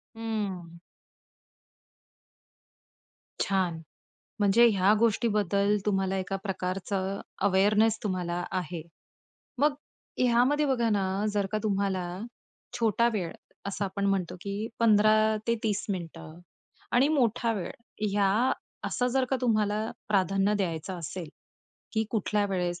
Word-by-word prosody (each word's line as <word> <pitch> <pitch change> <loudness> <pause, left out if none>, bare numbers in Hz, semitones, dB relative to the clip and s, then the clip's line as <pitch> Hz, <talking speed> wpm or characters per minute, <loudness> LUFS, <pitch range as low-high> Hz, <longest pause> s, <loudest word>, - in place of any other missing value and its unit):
हं. 195 -7 -4 2.6
छान. 180 -4 0 0.6
म्हणजे 205 +4 +5
ह्या 200 0 +4
गोष्टीबद्दल 210 -3 +2
तुम्हाला 195 -1 +1
एका 195 +1 -2
प्रकारचं 190 0 -2 0.3
अवेअरनेस 210 +3 +3
तुम्हाला 175 -3 -2
आहे. 175 -3 -3 0.8
मग 290 +2 +3 0.5
ह्यामध्ये 255 +5 +3
बघा 240 -4 +1
ना, 195 0 0
जर 200 -1 +1
का 215 - +1
तुम्हाला 195 -3 0 0.7
छोटा 230 +1 +3
वेळ 180 -5 -2 0.4
असं 200 0 -2
आपण 200 +1 -2
म्हणतो, 185 -3 0
की 205 +2 -3
15 215 0 +4
ते 230 - +3
30 210 -2 0
मिनिटं 165 -3 -6 0.5
आणि 260 +4 +4
मोठा 240 -5 +2
वेळ 195 -5 -4 0.4
ह्या 205 +5 +3 0.4
असं 250 - 0
जर 265 -1 +2
का 265 - +2
तुम्हाला 215 -3 +2 0.3
प्राधान्य 195 0 +2
द्यायचं 180 -1 -2
असेल, 165 0 -6 0.6
की 220 0 +1
कुठल्या 210 -1 +1
वेळेस 180 -2 -2
200 Hz, 110 wpm, -28 LUFS, 185-220 Hz, 2.6 s, म्हणजे